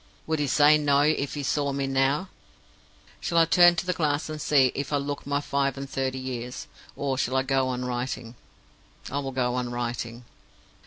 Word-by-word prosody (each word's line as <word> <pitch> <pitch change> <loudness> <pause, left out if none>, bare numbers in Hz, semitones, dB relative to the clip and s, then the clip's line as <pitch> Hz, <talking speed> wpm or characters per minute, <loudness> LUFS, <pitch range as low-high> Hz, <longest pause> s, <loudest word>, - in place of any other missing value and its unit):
Would 160 -1 -1
he 145 - 0
say 150 +2 +5
No 145 -1 +3
if 145 -1 +1
he 145 - -4
saw 140 +1 0
me 140 0 -2
now? 135 +7 +1 0.9
Shall 170 - -2
I 165 - +6
turn 175 +1 +6
to 175 - -2
the 180 - 0
glass 150 -2 -1
and 155 -1 -5
see 135 -4 +4
if 140 +1 -4
I 145 - +2
look 140 0 -4
my 140 0 +1
five 140 -1 -1
and 135 0 -5
thirty 130 -1 -2
years? 125 -1 -5 0.3
or 135 -2 -2
shall 130 0 0
I 130 - +2
go 135 -1 +1
on 125 0 -3
writing? 125 -1 -4 0.8
I 140 - -1
will 135 -1 -4
go 125 -1 0
on 125 -1 -2
writing. 120 0 -4
135 Hz, 200 wpm, -26 LUFS, 130-145 Hz, 0.9 s, I